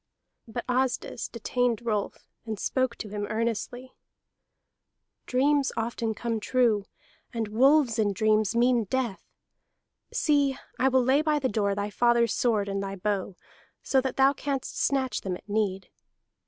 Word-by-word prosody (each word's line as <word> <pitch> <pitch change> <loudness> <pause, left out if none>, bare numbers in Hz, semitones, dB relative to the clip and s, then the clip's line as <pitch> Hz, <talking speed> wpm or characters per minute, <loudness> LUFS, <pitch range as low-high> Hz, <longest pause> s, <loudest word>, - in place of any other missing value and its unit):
But 235 +1 -5
Asdis 255 0 -1
detained 240 0 -1
Rolf, 210 -3 -2 0.2
and 220 -2 -4
spoke 255 +3 0
to 210 - -7
him 205 0 -4
earnestly. 235 +3 -3 1.3
"Dreams 275 +2 +2
often 225 -1 -2
come 230 0 -2
true, 225 -3 +2 0.5
and 225 -3 -3
wolves 255 +1 +4
in 210 -2 +2
dreams 215 +1 +2
mean 240 -1 +3
death. 240 -2 -2 0.9
See, 285 -3 +2 0.2
I 260 - +4
will 260 -1 +3
lay 265 +4 +3
by 305 -1 +1
the 265 -3 0
door 200 -1 0
thy 205 +1 -3
father's 235 0 +3
sword 215 -5 +1
and 195 0 -2
thy 195 0 -4
bow, 195 -1 -2 0.5
so 265 - +2
that 260 -1 -3
thou 270 +1 +5
canst 275 -2 -4
snatch 265 -2 0
them 185 -2 -3
at - - -23
need. 200 -3 -1
235 Hz, 145 wpm, -27 LUFS, 210-260 Hz, 1.3 s, thou